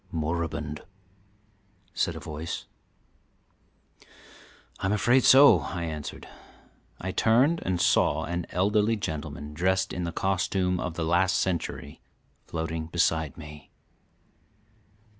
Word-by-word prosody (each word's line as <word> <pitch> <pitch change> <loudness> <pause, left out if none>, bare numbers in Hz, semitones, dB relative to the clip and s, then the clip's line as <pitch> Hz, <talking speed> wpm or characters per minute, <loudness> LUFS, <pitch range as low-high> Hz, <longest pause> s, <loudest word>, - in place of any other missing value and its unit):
"Moribund," 80 -2 -3 1.1
said - - -1
a - - -6
voice. 80 +2 -6 2.1
"I'm 95 - -1
afraid 120 +5 +3
so," 140 +2 +8
I 85 -2 -5
answered. 75 -3 -6 0.7
I 95 - -4
turned 130 - +3
and 90 -1 -1
saw - - +2
an 85 0 -3
elderly 105 +5 +2
gentleman, 75 -5 -5
dressed 95 +3 0
in 90 - -3
the 85 - -3
costume 90 0 0
of 90 -2 -4
the 85 -2 -2
last 90 +3 +2
century, 85 -5 -3 0.5
floating 80 -1 -4
beside 80 -3 0
me. 75 -2 -11
85 Hz, 105 wpm, -27 LUFS, 80-95 Hz, 2.1 s, so